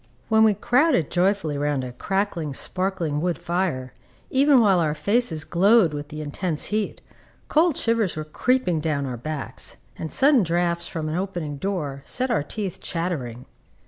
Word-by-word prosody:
When 220 0 +5
we 215 -2 +5
crowded 250 - +2
joyfully 175 -5 +1
round 145 -2 0
a 125 - -5
crackling, 170 0 -2
sparkling 180 -5 -2
wood 175 0 0
fire, 170 -8 -2 0.4
even 275 0 +5
while 200 -5 +4
our 155 -2 +1
faces 200 -5 0
glowed 195 -1 +4
with 145 0 -5
the 155 0 -6
intense 155 +2 -2
heat, 215 -1 -1 0.5
cold 320 0 +3
shivers 230 -5 +1
were 155 - -2
creeping 180 +1 +1
down 150 -3 -1
our 130 -2 -4
backs, 140 +4 -5 0.2
and 160 - -4
sudden 275 -2 +5
draughts 170 -1 0
from 160 -2 -4
an 155 - -2
opening 175 -6 -3
door 150 -6 -3
set 255 - -1
our 230 - +2
teeth 195 +4 -5
chattering. 145 -9 -3
175 Hz, 160 wpm, -24 LUFS, 150-205 Hz, 0.5 s, When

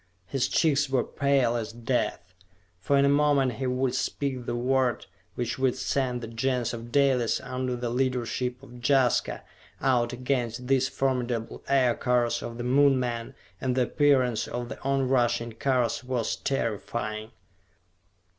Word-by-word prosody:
His 130 +7 0
cheeks 145 -3 +2
were 130 -3 +2
pale 135 -4 +1
as 115 -2 -3
death, 115 -5 -2 0.5
for 140 +9 +1
in 140 - +5
a 140 +1 +4
moment 135 -3 +3
he 130 - -1
would 125 0 0
speak 130 -1 -2
the - - -1
word 130 0 +1 0.3
which 120 +1 -3
would 130 -2 +2
send 130 -1 -1
the 115 - -5
Gens 125 +1 -1
of 120 0 -7
Dalis, 130 -4 +2
under 130 -1 -3
the 120 -1 -3
leadership 125 0 -1
of 125 -2 -12
Jaska, 130 -2 +2 0.4
out 120 -3 +2
against 125 -1 -2
these 130 0 +2
formidable 125 -4 -2
Aircars 125 -2 +2
of 115 - -6
the 120 - -4
Moon 135 +2 +4
men, 120 -2 -3 0.3
and 130 -2 0
the 130 - +3
appearance 130 -5 +2
of 120 0 -4
the - - -8
on 135 -1 +1
rushing 120 -2 +1
cars 125 0 0
was 125 -3 -1
terrifying. 110 -3 -3
125 Hz, 150 wpm, -27 LUFS, 120-135 Hz, 0.5 s, in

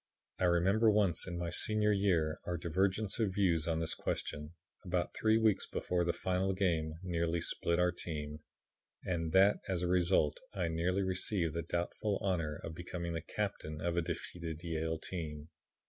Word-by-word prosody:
"I 95 - +3
remember 95 +6 +4
once 100 -6 +2
in 85 -1 -4
my 85 -1 -3
senior 105 +3 +2
year 90 -6 +2
our 90 - -1
divergence 95 +6 0
of 100 -5 0
views 85 -6 +2
on 80 -1 +1
this 80 - +1
question, 75 +2 -4 0.3
about 90 -2 -1
three 110 0 +3
weeks 110 -3 +2
before 90 -1 -1
the 85 - +2
final 95 +2 0
game, 80 -5 0
nearly 85 -1 0
split 85 +1 0
our 90 0 +3
team, 75 -3 -5 0.6
and 80 -3 -1
that 95 +2 +6
as 90 -2 -1
a - - +1
result 90 -4 +2 0.2
I 90 -4 0
nearly 90 +4 0
received 95 -3 0
the 85 - -1
doubtful 85 +5 -1
honor 85 -7 -1
of 80 - -5
becoming 85 0 -5
the 80 - -2
captain 75 +1 -4
of 85 +1 -1
a 85 - +2
defeated 85 -1 -5
Yale 80 -1 -1
team. 75 -3 -5
85 Hz, 170 wpm, -34 LUFS, 80-95 Hz, 0.6 s, that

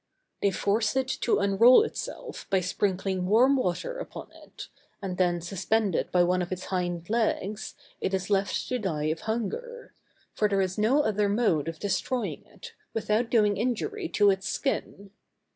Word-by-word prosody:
_] - - -46
They 200 - +3
force 210 +5 0
it 265 -1 +1
to 235 - +2
unroll 210 - +6
itself, - - -6
by 195 - +3
sprinkling 185 0 -1
warm 245 +7 +5
water 265 - -2
upon - - -8
it, - - -12 0.3
and 185 -2 -5
then, 175 -2 +2
suspended 195 +2 0
by 180 -1 +4
one 180 +1 +1
of 180 - -4
its 185 0 -4
hind 175 -2 -2
legs, 215 -2 -1 0.2
it - - -1
is 190 +1 -2
left 200 0 0
to 250 - -1
die 155 -7 -1
of 160 - -3
hunger; 475 - -4 0.4
for 210 - +1
there 200 -1 +1
is 190 +1 -1
no 260 +8 +3
other 210 -3 +1
mode 200 -9 +1
of 165 0 -4
destroying 205 +6 -2
it, - - -12 0.2
without 225 +2 0
doing 210 -4 +3
injury 325 - -2
to 205 -1 +4
its 190 0 -2
skin. 200 -7 -3
205 Hz, 170 wpm, -27 LUFS, 185-235 Hz, 0.4 s, unroll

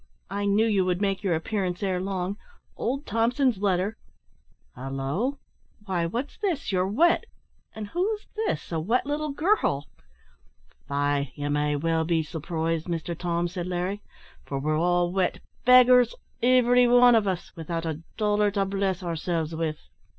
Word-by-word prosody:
I 200 +1 -2
knew 205 +2 +3
you 205 -4 +2
would 180 -1 0
make 195 -1 0
your 185 -5 +1
appearance 180 +1 -2
ere 185 -2 0
long. 190 0 -2 0.4
Old 275 +5 -2
Thompson's 235 +1 +1
letter 195 +2 0 0.8
halloo! 135 - -2 0.5
why 175 -4 0
what's 240 +11 -4
this? 355 - -1
You're 185 -1 +1
wet! 335 - +3 0.5
and 215 -1 -5
who's 415 - -1
this 435 - -2
a 165 - 0
wet 225 +12 +1
little 300 +1 -2
girl?" 290 - +1 1.0
"Faix, 145 0 0
ye 145 0 -4
may 150 0 +1
well 165 +2 +1
be 165 0 +1
surprised, 165 +1 -3
Mister 170 0 -2
Tom," 170 0 -1
said 175 0 -5
Larry, 180 +3 -2 0.4
"for 140 - -4
we're 155 +3 0
all 175 +2 +2
wet 185 -1 0 0.3
beggars, 250 -1 +7 0.3
ivery 245 0 +5
wan 245 0 +7
o' 210 -3 +3
us 180 -2 -5
without 165 0 -4
a 160 -1 -3 0.2
dollar 210 -1 +2
to 200 -1 0
bless 195 -1 -1
ourselves 165 -1 -2
with." 160 -1 -2
190 Hz, 150 wpm, -26 LUFS, 165-230 Hz, 1.0 s, beggars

